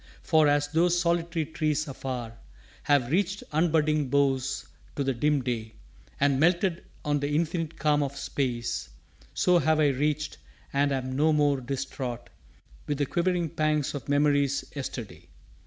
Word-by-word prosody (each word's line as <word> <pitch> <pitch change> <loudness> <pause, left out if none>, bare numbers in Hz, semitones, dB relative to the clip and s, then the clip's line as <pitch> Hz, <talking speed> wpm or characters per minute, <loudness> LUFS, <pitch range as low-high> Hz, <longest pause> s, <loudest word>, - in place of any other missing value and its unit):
For, 155 -2 +4
as 145 0 +2
those 170 +3 +2
solitary 170 -1 0
trees 155 0 -1
afar 125 -4 -5 0.5
Have 140 -4 +2
reached 190 +3 0
unbudding 155 -2 +2
boughs 135 -1 +1 0.3
to 140 - -1
the 135 0 0
dim 145 +2 +1
day 115 -3 -3 0.4
And 140 -1 +3
melted 175 +2 +2 0.2
on 145 0 +1
the 145 0 -2
infinite 165 0 -1
calm 150 -2 +2
of 140 -1 -3
space, 125 -4 -2 0.5
So 180 -1 +4
have 160 -1 +2
I 150 -2 +4
reached, 150 +3 -1 0.3
and 140 +1 +2
am 130 -1 -2
no 155 +3 +3
more 145 -2 +2
distraught 130 -2 -5 0.6
With 145 - -1
the 145 - +1
quivering 175 +2 0
pangs 155 -3 0
of 145 -1 -6
memory's 145 -1 +2
yesterday. 115 - -6
145 Hz, 145 wpm, -27 LUFS, 135-160 Hz, 0.6 s, For